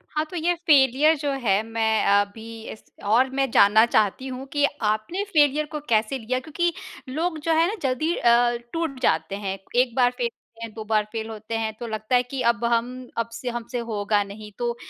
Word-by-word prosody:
हाँ, 305 +1 +1
तो 360 - -9
ये 345 +1 +1
फ़ेलियर 285 +1 +5
जो 285 0 -2
है, 225 -7 +1
मैं 220 -1 +1
अभी 210 +3 0
इस 220 - -11 0.2
और 240 +6 +3
मैं 270 -2 +1
जानना 220 +3 +6
चाहती 220 +3 +1
हूँ 260 +1 -6
कि 290 -1 +3 0.3
आपने 215 - -3
फ़ेलियर 305 -6 +2
को 300 - -3
कैसे 220 +3 +2
लिया? 255 +3 -2
क्योंकि 340 +5 -1 0.4
लोग 320 +5 -2
जो 325 - +4
है 325 +1 +4
ना, 415 - -2
जल्दी 280 +6 0
अ, 240 0 +3 0.2
टूट 325 -6 -2
जाते 195 -5 +1
हैं। 195 0 -2 0.2
1 250 -2 +1
बार 245 -1 +4
फ़ेल 240 -1 0
होते 230 - -27
हैं, 225 - -10
2 220 - -7
बार 215 0 +1
फ़ेल 225 -1 -4
होते 220 +1 -6
हैं, 220 -1 -2
तो 235 - -5
लगता 215 +2 -1
है 245 - +4
कि, 255 +1 -5
"अब 235 0 +1
हम 235 0 +2 0.3
अब 230 0 -1
से 245 +2 -4
हमसे 240 +1 -4
होगा 205 -1 +1
नहीं।" 210 +1 -10
तो 240 -1 -2
240 Hz, 210 wpm, -24 LUFS, 220-275 Hz, 0.4 s, जानना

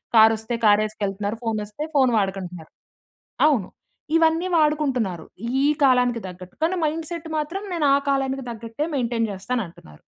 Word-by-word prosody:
కారొస్తే 220 +1 +5
కారేసుకెళ్తన్నారు. 210 0 +1
ఫోనొస్తే 215 +3 -3
phone 260 -3 +4
వాడకంటన్నారు. 185 -4 -4 0.8
అవును. 250 -11 +2 0.5
ఇవన్నీ 330 +2 +3
వాడుకుంటున్నారు, 270 - +1 0.4
ఈ - - +4 0.2
కాలానికి 250 -3 +4
తగ్గట్టు, 180 0 -10
కానీ 340 +3 +2
మైండ్‌సెట్ 325 +2 -3
మాత్రం 310 +6 -2
నేను 330 -4 0
ఆ - - +6
కాలానికి 270 -1 0
తగ్గట్టే 230 +4 -4
మెయింటైన్ 240 -4 0
చేస్తానంటన్నారు. 190 - -5
235 Hz, 120 wpm, -23 LUFS, 205-295 Hz, 0.8 s, ఆ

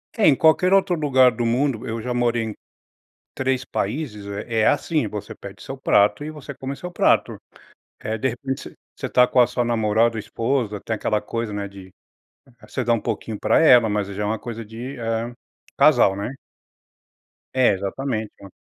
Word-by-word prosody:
É, 220 - +4
em 145 - +6
qualquer 165 +6 +4
outro 190 -2 +3
lugar 130 -5 +4
do 120 +1 -3
mundo 125 0 0
eu 115 0 -3
já 125 +2 -3
morei 120 -1 +1
em 110 -2 -5 0.8
3 130 -1 -1
países 110 -3 -4
eh 105 +3 -3
é 110 - +3
assim, 150 -3 +1
você 105 0 -6
pede 100 -1 -11
seu 135 - -7
prato 105 -1 +2
e 155 - -5
você 150 -3 -9
come 135 +1 -5
seu 180 +4 -7
prato, - - +2 0.7
eh, 110 +1 -3
de 130 +4 0
repente, 130 +3 -4
você - - -20 0.2
você - - -4
tá 125 - +5
com - - +2
a 120 - +6
sua 125 - -1
namorada 115 0 +2
ou - - -2
esposa, 115 0 -2
tem 110 - -1
aquela 105 0 0
coisa, 115 -2 -4
né, 100 -1 -4
de 95 -1 -12 0.8
você 130 - -3
dá 120 - +2
um 115 - +1
pouquinho 110 -1 -4
pra - - +3
ela, 125 -7 +6
mas 105 -1 -1
aí 100 - -7
já 105 - -3
é - - -1
uma 110 +2 -1
coisa 115 0 -7
de, 120 +5 -8
eh, 115 0 -2 0.5
casal, 95 - +5
né? 105 +7 -4 1.2
É, 130 -5 +4
exatamente, 110 +3 -3
então... 100 - -12
115 Hz, 195 wpm, -22 LUFS, 105-130 Hz, 1.2 s, em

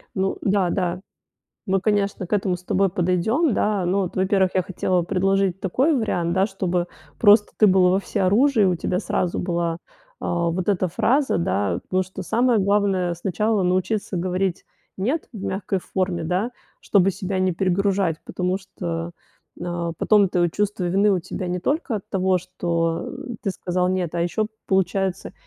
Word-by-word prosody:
Ну 190 0 0
да, 195 -3 +2
да. 180 -1 -1 0.7
Мы, 195 -2 +1
конечно, 200 -3 0
к - - -4
этому 190 -3 +1
с 180 - -17
тобой 195 +1 +1
подойдём, 185 - +1
да. 205 -2 0
Но 190 +3 +1
вот, 185 - -4
во-первых, 190 0 +2
я 185 - +4
хотела 180 0 0
предложить 195 +1 +1
такой 260 - +1
вариант. 175 -8 0
Да, 190 +1 +3
чтобы 180 -3 -2 0.3
просто 210 -1 +6
ты 215 - +6
был 185 -1 +5
во 190 +2 +3
всеоружии 215 +6 +2
и - - +5
у 180 -2 +2
тебя 180 +2 -1
сразу 180 -2 -1
была, 170 -2 -1 0.5
э, - - -4
вот 175 +1 -1
эта 185 -2 +1
фраза, 265 - +1
да. 100 - 0
Потому 185 0 0
что 185 +1 -8
самое 235 +4 +2
главное 195 -3 +1
сначала 195 +4 0
научиться 185 +2 0
говорить 185 +1 -1 0.3
"нет" 255 +12 -1
в 210 - -7
мягкой 195 0 -2
форме, 185 -2 -2
да, 185 +8 -1 0.3
чтобы 195 -2 +3
себя 190 0 -3
не 185 0 +2
перегружать. 190 -1 +1
Потому 180 +1 -1
что, 170 -3 -5 0.5
э, 175 -1 -3
потом 205 -3 +4
твое 175 -1 +2
чувство 205 0 -1
вины 195 +4 +3
у 190 - +2
тебя 185 +1 -5
не 180 +1 -2
только 280 - -1
от 200 - -6
того, 190 -1 +2
что 170 -2 -2 0.3
ты - - -1
сказал 180 -1 -1
нет, 185 -3 -1
а 170 - -1
ещё 210 +5 0 0.2
получается 190 0 0
185 Hz, 170 wpm, -23 LUFS, 175-200 Hz, 0.7 s, просто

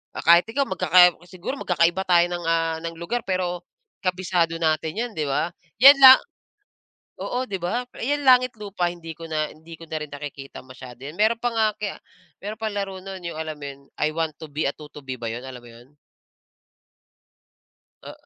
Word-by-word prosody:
ah, - - -5
kahit 170 +3 +6
ikaw 270 +5 0
magkaka 180 - +5 0.2
siguro 185 +10 -6
magkakaiba 175 +1 +1
tayo 175 -1 +5
ng, 175 0 -4
ah, 165 -1 0
ng 165 0 -6
lugar 170 +9 -3
pero, 180 -2 -2 0.3
kabisado 180 -3 0
natin 160 -1 -1
'yan, 235 +2 -3
'di 155 -7 -3
ba? 150 +5 -1 0.3
'Yan 275 +1 +10
lang 260 -1 +11 1.0
oo, 250 +1 -2
'di 195 -6 -5
ba? 235 +8 -2
Ayan 290 +3 -2
langit, 255 -2 +5
lupa, 200 -4 -2
hindi 170 -2 -8
ko 165 +1 -10
na 155 -1 -2
hindi 160 +1 -13
ko 165 - -12
na 160 -1 -5
rin 150 - -6
nakikita 140 -2 -9
masyado 130 -1 -12
'yan. 145 - -7
Meron 220 +5 +2
pa 240 0 -2
nga 225 -1 +2
kaya 205 -1 -4 0.5
meron 210 +2 -6
pang 220 -2 -3
laro 195 -2 -4
no'n, 190 -1 -7
'yung 170 -2 -6
alam 160 0 -4
mo 150 -1 -10
'yon, 140 0 -11 0.2
I 150 - +3
Want 160 0 -2
to 160 - -8
Be 150 +2 -2
a 140 - 0
Tutubi 150 -3 -9
ba 115 - -3
'yon, 120 +3 -6
alam 125 -2 -9
mo 120 - -15
'yon? 120 +4 -17 2.1
A - - -8
170 Hz, 195 wpm, -23 LUFS, 155-200 Hz, 2.1 s, lang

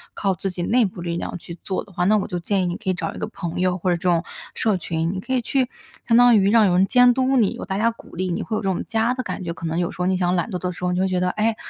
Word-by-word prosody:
靠 195 -1 0
自 195 - -3
己 180 -1 -4
内 235 +5 +3
部 180 -2 -6
力 170 -1 -3
量 175 - -4
去 170 0 -10
做 190 - -2
的 200 - -18
话， 175 -1 -1
那 210 +3 +4
我 200 - -2
就 180 -3 -3
建 190 +2 0
议 - - 0
你 175 0 -2
可 200 - -4
以 - - +3
找 180 - -4
一 - - -10
个 - - -3
朋 170 0 -5
友 180 0 +1
或 185 0 -1
者 175 - +3
这 - - -16
种 170 0 +2 0.3
社 215 -4 +1
群， 165 0 -2
你 190 - -4
可 230 - -8
以 255 - +2
去 255 +1 0 0.4
相 230 - +4
当 245 -1 +7
于 195 0 +3
让 225 -1 +5
有 180 - +3
人 190 - +5
监 245 -1 +6
督 260 +1 +1
你， 215 -5 +3
有 - - -7
大 190 - -3
家 230 +3 +2
鼓 230 - -15
励 185 +1 -2
你 - - -2
会 220 - -3
有 - - -2
这 195 - 0
种 185 - -1
家 225 +2 +1
的 255 - -3
感 - - -5
觉。 170 - -3
可 165 - -8
能 160 0 -2
有 175 - -1
时 - - -13
候 - - +1
你 185 +1 +2
想 180 -1 +1
懒 175 - -1
惰 185 - -3
的 180 +1 -2
时 180 - -10
候， 180 - +1
你 180 - 0
会 190 - +2
觉 185 -1 0
得： 180 0 +1
“哎， 220 +1 +1
185 Hz, 380 characters per minute, -22 LUFS, 175-220 Hz, 0.4 s, 当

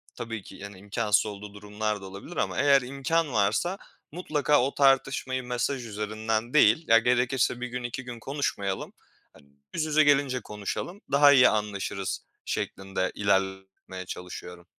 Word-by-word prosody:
tabii 115 -4 -5
ki, - - -12
yani, 100 -1 -9
imkânsız 105 +1 +1
olduğu 105 -1 -7
durumlar 105 0 -3
da - - -9
olabilir 100 - -9
ama - - -1
eğer 140 -1 +5
imkân 140 +3 -1
varsa 110 - +1 0.3
mutlaka 150 -4 +1
o 135 +2 0
tartışmayı 135 -1 +2
mesaj 125 +1 -2
üzerinden 110 +2 -3
değil, 145 +2 +5
ya 115 - +7
gerekirse 125 +1 +1
1 125 - -2
gün 125 0 -5
2 120 +2 -4
gün 120 -2 -8
konuşmayalım, 110 -8 -3 0.4
hani, 70 - -20 0.2
yüz 160 - -1
yüze 155 0 +4
gelince 140 -3 +2
konuşalım, 105 - -5
daha 145 +1 +7
iyi 125 -3 +7
anlaşırız 100 -2 -3 0.2
şeklinde 95 -1 -3
ilerletmeye 95 -1 -2
çalışıyorum. 90 -1 -8
115 Hz, 145 wpm, -27 LUFS, 100-135 Hz, 0.4 s, ya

